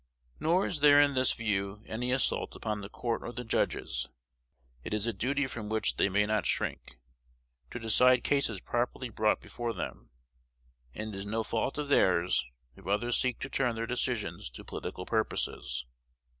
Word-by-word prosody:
Nor 175 +5 +3
is 160 - -2
there 145 0 +7
in 145 -1 +5
this 130 -1 +4
view 100 -2 -2
any 125 +3 -2
assault 130 +1 +1
upon 105 -2 -3
the 100 - -7
court 115 +1 -2
or 120 - -5
the 125 0 -6
judges. 65 - 0 0.7
It - - -2
is 105 0 0
a 115 - 0
duty 140 +7 0
from 120 -5 -5
which 110 0 +1
they - - +3
may 105 +2 +3
not 105 -3 +1
shrink, - - -2 0.7
to - - -6
decide 125 +2 +4
cases 140 -8 +1
properly 120 +1 -2
brought 110 0 +2
before 120 -1 -4
them; 90 - -6 0.9
and 110 0 -5
it - - -6
is 95 - -5
no 110 +2 -1
fault 115 +6 -1
of 150 -1 -2
theirs 90 -10 +3 0.3
if - - -14
others 115 +5 +1
seek 125 -2 +1
to 135 - -3
turn 125 -4 +1
their 115 0 -2
decisions 120 - -2
to - - -10
political 90 - -6
purposes. 65 - -1
115 Hz, 175 wpm, -31 LUFS, 105-125 Hz, 0.9 s, there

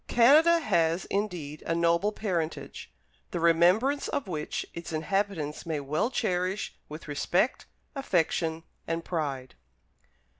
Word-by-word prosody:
Canada 305 +8 +6
has, 170 - +1
indeed, 175 -8 -3
a 165 - +1
noble 170 +4 +2
parentage, 175 -7 -4 0.4
the 175 - -3
remembrance 180 - +3
of 260 - -2
which 155 -4 -3
its 170 0 -7
inhabitants 160 -1 -2
may 160 -3 -2
well 150 - -1
cherish 190 -4 -1 0.2
with 155 +2 -9
respect, 175 - 0 0.3
affection, 165 - 0 0.2
and 165 0 -2
pride. 140 -7 -3
170 Hz, 115 wpm, -28 LUFS, 160-205 Hz, 0.4 s, Canada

